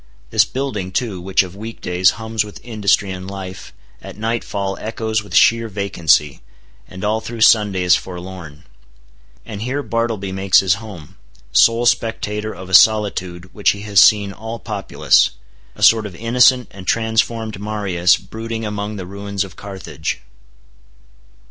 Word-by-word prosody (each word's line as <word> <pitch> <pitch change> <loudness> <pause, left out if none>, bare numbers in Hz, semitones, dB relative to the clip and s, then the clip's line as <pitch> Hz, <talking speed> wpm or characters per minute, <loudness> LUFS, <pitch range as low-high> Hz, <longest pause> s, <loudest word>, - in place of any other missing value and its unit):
This - - +4
building 110 -9 -4
too, 100 -3 -2
which 95 +1 +2
of 90 0 -10
week 110 +3 -8
days 90 0 +2
hums 110 -1 -2
with 105 -1 -11
industry 105 -4 0
and 95 0 -7
life, 95 -1 -8 0.3
at - - -10
nightfall 105 -3 -3
echoes 110 0 -2
with 100 - -8
sheer 115 0 +4
vacancy, 85 -8 +1 0.5
and 95 0 -10
all 110 +2 0
through 115 0 -7
Sunday 105 -4 +4
is 90 - +5
forlorn. 90 -4 -8 0.8
And 105 -2 -7
here 130 +5 -2
Bartleby 115 -3 -2
makes 95 0 +3
his 95 +2 +1
home; 95 -9 -11 0.3
sole 115 +1 +4
spectator 110 -2 -1
of 95 -1 -10
a 95 - -9
solitude 95 -4 +3
which 105 - +2
he 100 - -9
has 105 -2 +2
seen 100 -2 +5
all 110 +2 -7
populous—a - - -1
sort 110 -2 +5
of 95 - -11
innocent 125 +4 +3
and 95 -1 -12
transformed 110 -2 0
Marius 100 -4 +1
brooding 115 +3 -6
among 105 0 -4
the 95 -3 -6
ruins 100 +1 -4
of 95 -3 -11
Carthage! 95 -6 -6
100 Hz, 150 wpm, -19 LUFS, 95-110 Hz, 0.8 s, is